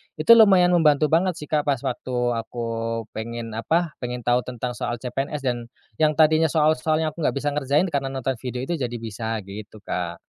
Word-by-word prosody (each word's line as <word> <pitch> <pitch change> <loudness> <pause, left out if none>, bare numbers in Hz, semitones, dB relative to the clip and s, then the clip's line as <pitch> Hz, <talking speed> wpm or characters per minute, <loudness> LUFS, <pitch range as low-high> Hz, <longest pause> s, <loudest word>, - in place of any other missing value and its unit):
itu 155 +8 +3
lumayan 195 -6 +7
membantu 155 -3 +3
banget 175 +1 +2
sih 150 - -8
Kak, 150 -1 +1
pas 135 -4 0
waktu 125 0 -4 0.2
aku, 115 0 -4
pengen 115 +1 -6
apa, 160 +10 0
pengen 125 -1 -5
tau 120 +1 +3
tentang 125 0 -4
soal 120 0 -3
CPNS 135 +4 -4
dan, 120 -2 -2 0.3
yang 155 -1 +3
tadinya 160 +1 +4
soal-soalnya 155 0 +1
aku 170 - -14
nggak 150 - 0
bisa 145 +1 -1
ngerjain, 150 +5 +1
karena 140 -2 -1
nonton 135 -2 -3
video 125 0 -5
itu 165 +4 -3
jadi 120 -2 -3
bisa, 110 -1 -4
gitu 105 +2 -10
Kak. 85 -1 -4
135 Hz, 185 wpm, -23 LUFS, 115-155 Hz, 0.3 s, lumayan